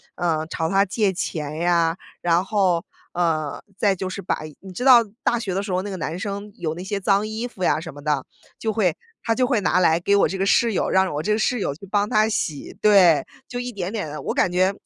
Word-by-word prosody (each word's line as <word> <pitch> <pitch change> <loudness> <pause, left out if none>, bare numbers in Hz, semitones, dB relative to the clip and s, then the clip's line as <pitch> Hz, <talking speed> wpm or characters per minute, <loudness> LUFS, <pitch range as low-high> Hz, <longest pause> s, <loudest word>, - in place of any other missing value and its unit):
呃， 160 -3 0
朝 160 0 -2
她 195 +1 +3
借 205 +1 +1
钱 155 -4 -4
呀， 170 -1 +2 0.2
然 175 +1 +2
后， 185 -4 +1 0.3
呃， 160 -4 0 0.2
再 200 -1 +2
就 190 0 -4
是 195 - -5
把 175 - -2 0.2
你 190 -1 -11
知 245 +8 -4
道 255 -3 +9 0.2
大 240 - +2
学 195 -5 -3
的 195 - -1
时 200 -2 -4
候 180 - +1
那 205 - -6
个 190 - -4
男 165 +1 -4
生 200 +1 -5
有 160 -2 -4
那 180 - -7
些 200 +1 -3
脏 200 +2 +2
衣 220 +3 -4
服 195 -6 -8
呀 165 - +2
什 160 0 -7
么 145 - -10
的， 150 -3 0 0.4
就 220 - -1
会 195 -7 +1 0.3
他 230 - +1
就 255 - +2
会 245 -4 +2
拿 180 -2 +2
来 165 -2 +4
给 200 +3 +2
我 200 - +4
这 190 - -4
个 190 - 0
室 230 +3 +3
友， - - 0
让 190 0 +2
我 145 - -2
这 210 - +1
个 215 - 0
室 245 +2 +1
友 165 - -1
去 195 - -12
帮 205 +1 +1
他 215 +1 +3
洗。 155 -9 -3
对， 190 -7 +5 0.2
就 245 - -4
一 245 0 -4
点 190 -2 -4
点 205 -8 -3
地， 150 - -6
我 - - -2
感 - - +2
觉， 185 +2 +2
190 Hz, 270 characters per minute, -23 LUFS, 170-210 Hz, 0.4 s, 道